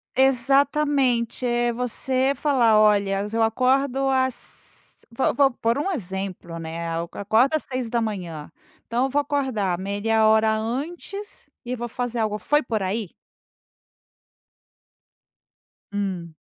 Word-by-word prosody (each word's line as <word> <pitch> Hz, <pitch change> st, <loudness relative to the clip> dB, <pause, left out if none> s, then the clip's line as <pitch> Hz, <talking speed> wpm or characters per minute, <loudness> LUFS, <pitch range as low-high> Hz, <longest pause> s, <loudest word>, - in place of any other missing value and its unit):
Exatamente. 270 Hz, -1 st, +2 dB
É 240 Hz, 0 st, +1 dB
você 255 Hz, +2 st, 0 dB
falar: 240 Hz, -7 st, +3 dB
"Olha, 200 Hz, -2 st, +3 dB
eu 230 Hz, -, +1 dB
acordo 265 Hz, +4 st, +2 dB
às 260 Hz, -1 st, -3 dB
vou 245 Hz, +3 st, +1 dB
vou 270 Hz, +1 st, +4 dB
por 230 Hz, +1 st, 0 dB
um 380 Hz, +7 st, -1 dB
exemplo, 190 Hz, -, -4 dB
né, 165 Hz, +1 st, -5 dB
eu 170 Hz, 0 st, -3 dB
acordo 220 Hz, +8 st, +2 dB
às 310 Hz, -, -1 dB
6h 235 Hz, -3 st, -1 dB, 0.3 s
da -, -, -12 dB
manhã, -, -, -19 dB, 0.4 s
então 240 Hz, +3 st, 0 dB
eu -, -, -2 dB
vou 290 Hz, +2 st, +1 dB
acordar 260 Hz, -11 st, -1 dB
meia 205 Hz, +3 st, +1 dB
hora 220 Hz, 0 st, +4 dB
antes 320 Hz, -, -5 dB, 0.2 s
e 250 Hz, +1 st, -2 dB
vou 240 Hz, 0 st, -4 dB
fazer 245 Hz, 0 st, -3 dB
algo. 215 Hz, -1 st, 0 dB
Foi 295 Hz, +7 st, +2 dB
por 220 Hz, -5 st, -2 dB
aí? 200 Hz, 0 st, -3 dB, 2.8 s
Hum. 185 Hz, -5 st, -3 dB
235 Hz, 125 wpm, -24 LUFS, 210-265 Hz, 2.8 s, vou